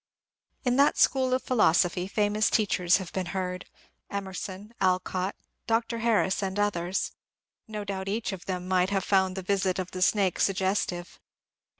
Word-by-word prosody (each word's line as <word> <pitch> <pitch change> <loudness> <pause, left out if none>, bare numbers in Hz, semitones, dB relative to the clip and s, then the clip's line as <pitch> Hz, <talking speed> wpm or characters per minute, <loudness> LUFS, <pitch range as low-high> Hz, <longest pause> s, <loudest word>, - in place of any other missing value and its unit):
In 250 0 +1
that 280 +1 +4
School 260 -1 +3
of 255 0 +1
Philosophy 180 -6 +2
famous 210 +1 +1
teachers 180 -6 +3
have 185 -3 -7
been 185 -2 -2
heard, 180 -1 -3 0.2
— - - -47
Emerson, 190 +2 -7
Alcott, 185 0 0 0.3
Dr. 230 0 0
Harris, 220 -4 +2
and 190 0 -2
others. 190 -2 0 0.6
No 215 -1 -5
doubt 195 -1 -4
each 215 +3 -1
of 190 -2 -7
them 180 -1 -4
might 185 0 +2
have 195 -2 0
found 190 -1 +2
the 190 - -5
visit 190 0 0
of 185 -1 -4
the 185 - -5
snake 190 -1 +2
sug 195 - +2
gestive. 185 -2 -2
190 Hz, 165 wpm, -27 LUFS, 185-210 Hz, 0.6 s, that